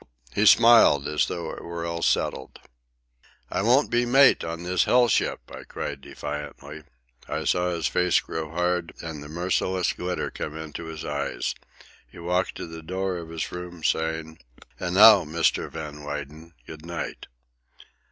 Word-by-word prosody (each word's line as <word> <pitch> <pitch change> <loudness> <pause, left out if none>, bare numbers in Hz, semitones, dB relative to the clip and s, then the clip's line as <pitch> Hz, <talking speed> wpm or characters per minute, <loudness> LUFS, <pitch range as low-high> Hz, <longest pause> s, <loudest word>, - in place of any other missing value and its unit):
He 105 +1 +3
smiled 115 -13 +6
as 75 0 +1
though 85 -1 -4
it - - -9
were 85 0 -5
all 85 0 -3
settled. - - -1 0.9
"I - - 0
won't 125 +7 +3
be 120 0 +3
mate 135 +3 +5
on 85 +1 -5
this 90 +1 +1
hell 125 0 +4
ship!" 115 - 0
I - - -8
cried 70 -2 -6
defiantly. 75 +1 -7 0.4
I - - -2
saw 90 0 +1
his 85 -2 -2
face 90 -2 +2
grow 80 -1 -5
hard 90 +1 -1
and 80 -3 -6
the 75 - -10
merciless 90 +2 0
glitter 90 0 -3
come 75 +1 -6
into 80 +1 -7
his 80 -1 -7
eyes. 70 -1 -2 0.5
He - - -17
walked 90 +2 -1
to - - -6
the 80 -1 -9
door 95 +2 -3
of 85 -1 -8
his 80 -1 -4
room, 90 -2 -8
saying: 80 0 -1 0.4
"And 90 0 -3
now, 105 -1 +9
Mr. 80 +2 0
Van 75 -1 -8
Weyden, 75 +3 -7
good 80 -1 -11
night." 85 0 -6
85 Hz, 160 wpm, -25 LUFS, 80-90 Hz, 0.9 s, now